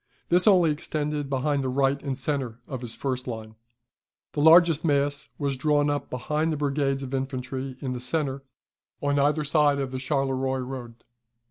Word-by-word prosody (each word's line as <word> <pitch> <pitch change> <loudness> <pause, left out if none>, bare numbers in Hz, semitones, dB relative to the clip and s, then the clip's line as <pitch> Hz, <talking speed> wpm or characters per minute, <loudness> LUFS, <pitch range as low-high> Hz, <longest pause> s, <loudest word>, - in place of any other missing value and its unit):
This 180 +4 +4
only 180 -6 +6
extended 150 -1 -3
behind 140 +1 0
the 130 - -1
right 135 +1 +1
and 135 -2 -3
centre 130 -4 -2
of 130 -4 -5
his 120 -2 -6
first 130 -2 -3
line. 110 -2 -6 0.8
The 145 - -1
largest 165 0 +6
mass 145 -2 0
was 140 -2 -1
drawn 145 +1 +2
up 145 - -3
behind 150 +5 -1
the 155 - -1
brigades 140 -1 0
of 130 0 -6
infantry 130 0 -3
in 130 -3 -2
the 125 - -4
centre, 135 +1 -2 0.6
on 145 0 +1
either 150 +2 +2
side 150 -1 +3
of 135 -2 -2
the 130 - -4
Charleroi 135 -1 0
road. 125 -2 -7
140 Hz, 170 wpm, -26 LUFS, 130-150 Hz, 0.8 s, only